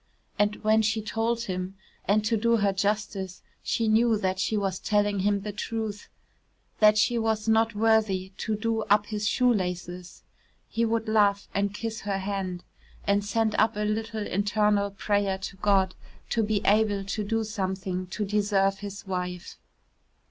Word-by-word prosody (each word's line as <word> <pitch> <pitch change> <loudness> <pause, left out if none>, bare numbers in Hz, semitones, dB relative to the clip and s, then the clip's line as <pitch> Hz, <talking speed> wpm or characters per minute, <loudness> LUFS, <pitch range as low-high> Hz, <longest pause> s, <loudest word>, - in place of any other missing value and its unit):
And 210 0 +2
when 220 +1 +4
she 220 +1 +1
told 225 +2 -1
him 185 -2 -4 0.3
and 210 +1 +2
to 225 +1 +2
do 235 +2 +2
her 200 -2 +2
justice 200 -1 -2 0.2
she 230 - 0
knew 225 +1 +4
that 190 -2 -1
she 215 +3 0
was 195 -2 -1
telling 205 -1 +1
him 200 +1 +1
the 210 +1 -4
truth 215 0 -4 0.7
that 215 0 +6
she 235 +2 +3
was 220 -1 -1
not 225 0 +3
worthy 210 -4 +2
to 215 - -2
do 225 +1 -1
up 205 0 +3
his 210 -1 -2
shoe 250 +1 +3
laces 180 -2 -4 0.4
he 230 +1 0
would 225 0 -1
laugh 205 -2 +3
and 200 0 0
kiss 225 0 -4
her 200 -1 -2
hand 190 -2 -3 0.4
and 200 0 +2
send 220 +1 0
up 220 - +3
a 210 - -2
little 215 0 -2
internal 205 +1 +1
prayer 200 0 0
to 190 0 -7
God 190 -2 +2 0.4
to 230 - +2
be 210 -1 0
able 205 -1 +3
to 200 +2 -3
do 225 +2 0
something 190 -3 -3
to 210 +3 -3
deserve 195 -1 +1
his 205 0 -7
wife. 180 -2 -4
205 Hz, 165 wpm, -27 LUFS, 195-220 Hz, 0.7 s, that